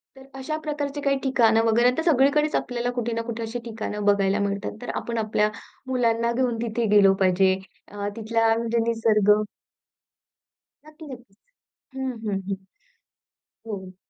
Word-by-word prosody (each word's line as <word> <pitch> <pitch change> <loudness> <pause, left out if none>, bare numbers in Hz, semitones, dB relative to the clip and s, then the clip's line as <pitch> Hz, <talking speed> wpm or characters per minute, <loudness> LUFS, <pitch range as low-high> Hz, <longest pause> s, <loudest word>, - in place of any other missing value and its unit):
तर 265 - -14
अशा 270 +4 -4
प्रकारचे 290 -1 -3
काही 275 -1 +1
ठिकाण 235 -4 +3
वगैरे 235 +2 +4
आता 290 +6 -1
सगळीकडेच 300 0 +3
आपल्याला 245 -1 -1
कुठे 240 -1 -1
ना 230 - -1
कुठे 230 0 -4
अशी 230 +2 -4
ठिकाणं 215 -2 -5
बघायला 200 0 +3
मिळतात. 200 - -2
तर - - -7
आपण 235 -1 -3
आपल्या 215 -1 +1 0.4
मुलांना 235 -2 +1
घेऊन 245 -1 0
तिथे 235 0 -1
गेलो 195 -1 +6
पाहिजे. 190 0 +3 0.3
अ, 205 0 -5
तिथला 225 0 +1
म्हणजे 235 0 -1
निसर्ग. 220 -3 +3 1.5
नक्की 310 +1 -13
नक्कीच. 235 -5 -15 0.6
हं, 265 -1 -2
हं, 195 -2 -1
हं. 195 - 0 1.1
हो. 190 -3 -7
230 Hz, 145 wpm, -24 LUFS, 210-255 Hz, 1.5 s, गेलो